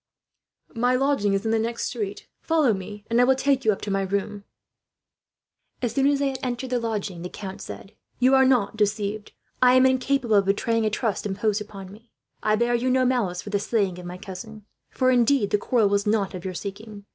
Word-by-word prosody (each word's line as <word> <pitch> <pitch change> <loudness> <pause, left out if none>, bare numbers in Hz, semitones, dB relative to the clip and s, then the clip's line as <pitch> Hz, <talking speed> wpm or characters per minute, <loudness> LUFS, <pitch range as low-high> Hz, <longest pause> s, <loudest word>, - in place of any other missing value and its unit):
"My 245 +1 +2
lodging 260 -7 +1
is 195 +2 -1
in 220 - +1
the 225 - +2
next 230 +1 -2
street. 205 -4 -5
Follow 310 -8 +2
me, 200 +2 -7
and 230 +1 +3
I - - +6
will 260 +1 +4
take 270 0 +1
you 220 - +4
up 195 - -4
to 205 - -4
my 195 0 +1
room." 200 +1 -3 1.3
As 240 -3 -2
soon 270 +2 +2
as 285 0 +3
they 280 0 0
had 265 -1 -5
entered 250 0 -4
the 250 - +1
lodging, 210 -6 -3
the 180 - -5
count 190 0 -8
said: 195 - -9 0.2
"You 255 +2 +3
are 265 0 +6
not 255 -6 +2
deceived. 210 0 -1 0.3
I 250 0 +6
am 255 0 +6
incapable 260 -3 +2
of 200 - +3
betraying 220 +3 +1
a - - +2
trust 215 -1 -2
imposed 205 +2 -1
upon 195 -3 -9
me. 225 +3 -16 0.3
I 215 - +2
bear 235 +2 +1
you 240 +2 +1
no 255 0 +3
malice 220 -9 0
for 205 - -8
the 205 - +1
slaying 200 -4 -1
of 175 - -8
my 180 +1 -7
cousin; 205 +3 -9 0.2
for 255 0 +1
indeed, 245 -3 +3
the 210 - +2
quarrel 230 -3 +2
was 200 0 0
not 210 -2 +1
of 180 -2 -7
your 185 -1 -4
seeking. 205 +2 -7
220 Hz, 220 wpm, -24 LUFS, 200-250 Hz, 1.3 s, I